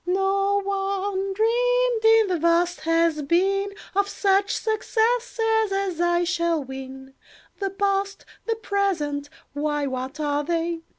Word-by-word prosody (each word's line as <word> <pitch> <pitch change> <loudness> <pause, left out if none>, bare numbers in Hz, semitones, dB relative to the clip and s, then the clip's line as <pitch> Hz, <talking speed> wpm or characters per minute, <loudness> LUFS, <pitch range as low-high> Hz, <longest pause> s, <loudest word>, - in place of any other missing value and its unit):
"No 390 +2 +1
one 390 0 -2
dreamed, 485 +2 +1
in 445 0 +6
the 360 -2 0
vast 340 +2 +2
Has 330 -1 +1
Been, 385 +7 +1 0.3
Of 400 0 +2
such 400 0 +1
successes 445 0 0
as 390 -3 -1
I 345 0 +2
shall 340 -3 0
win. 265 0 -9 0.5
"The 395 -1 -1
past, 395 0 -1 0.2
the 455 - +1
present—why, 295 - -2
what 260 +2 -5
are 290 -1 0
they? 335 +1 -2
385 Hz, 120 wpm, -24 LUFS, 325-405 Hz, 0.5 s, in